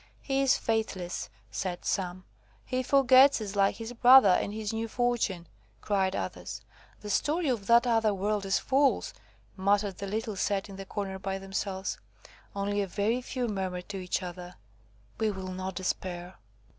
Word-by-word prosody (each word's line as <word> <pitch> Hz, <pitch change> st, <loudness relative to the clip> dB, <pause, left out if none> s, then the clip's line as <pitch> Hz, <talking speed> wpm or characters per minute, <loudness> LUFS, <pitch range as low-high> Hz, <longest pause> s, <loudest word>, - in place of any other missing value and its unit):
"He 270 Hz, -1 st, 0 dB
is 270 Hz, -1 st, +4 dB
faithless," 210 Hz, -6 st, -2 dB, 0.2 s
said 180 Hz, -2 st, -4 dB
some. 185 Hz, -1 st, -2 dB, 0.4 s
"He 255 Hz, 0 st, -1 dB
forgets 265 Hz, 0 st, +6 dB
us, 210 Hz, -2 st, -5 dB
like 195 Hz, -1 st, +3 dB
his 225 Hz, +1 st, -7 dB
brother, 245 Hz, -3 st, +8 dB
in 180 Hz, -, +1 dB
his 215 Hz, 0 st, -4 dB
new 225 Hz, +1 st, -2 dB
fortune," 230 Hz, -7 st, -1 dB, 0.3 s
cried 195 Hz, -2 st, 0 dB
others. -, -, -5 dB, 0.4 s
"The 210 Hz, -, -7 dB
story 310 Hz, -, +1 dB
of 220 Hz, -6 st, -2 dB
that 235 Hz, +1 st, +6 dB
other 225 Hz, -3 st, +3 dB
world 205 Hz, +1 st, -1 dB
is 195 Hz, -, +3 dB
false," 275 Hz, +1 st, +1 dB, 0.4 s
muttered 200 Hz, 0 st, +1 dB
the 200 Hz, -, -4 dB
little 215 Hz, +1 st, -3 dB
set 200 Hz, +1 st, -1 dB
in 195 Hz, -, -9 dB
the 195 Hz, -, -7 dB
corner 195 Hz, -2 st, -4 dB
by 195 Hz, 0 st, -3 dB
themselves. 195 Hz, 0 st, -4 dB, 0.6 s
Only 205 Hz, +1 st, 0 dB
a 200 Hz, -, -2 dB
very 210 Hz, +7 st, 0 dB
few 250 Hz, -1 st, -3 dB
murmured 185 Hz, -3 st, -4 dB
to 200 Hz, -, -4 dB
each 185 Hz, 0 st, -2 dB
other, 180 Hz, 0 st, -8 dB, 0.6 s
"We 220 Hz, -, +2 dB
will 190 Hz, -2 st, -5 dB
not 185 Hz, 0 st, -5 dB
despair." 180 Hz, 0 st, -4 dB
200 Hz, 165 wpm, -29 LUFS, 190-230 Hz, 0.6 s, brother